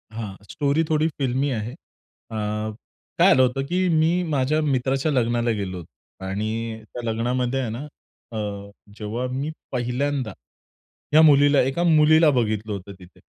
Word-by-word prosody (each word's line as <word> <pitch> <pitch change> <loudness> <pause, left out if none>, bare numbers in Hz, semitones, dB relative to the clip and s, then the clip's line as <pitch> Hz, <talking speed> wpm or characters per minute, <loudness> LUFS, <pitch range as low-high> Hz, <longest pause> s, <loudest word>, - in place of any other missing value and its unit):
हां, 110 -3 -6 0.2
स्टोरी 145 +2 +1
थोडी 155 0 +2
फिल्मी 135 +1 0
आहे. 115 -1 -3
अ, 115 - -16 0.8
काय - - +7
झालं 130 - +5
होतं, 130 +2 0
की 185 +5 0
मी 165 +2 +3
माझ्या 145 +1 +1
मित्राच्या 135 +1 0
लग्नाला 120 -2 +1
गेलो 95 -2 -4
होतो 90 +2 -15
आणि 110 +3 -3
त्या 120 +3 -9
लग्नामध्ये 125 +3 -1
आहे 125 - -2
ना 130 +7 -6 0.5
अ, - - -4 0.6
जेव्हा 110 +4 -3
मी 135 +4 -2 0.2
पहिल्यांदा 125 -1 -1 0.8
या 155 - +8
मुलीला 145 -2 +6
1 135 +7 0
मुलीला 155 -1 +5
बघितलं 110 -4 -1
होतं 100 0 -7
तिथे 90 -1 -16
130 Hz, 145 wpm, -23 LUFS, 115-145 Hz, 0.8 s, या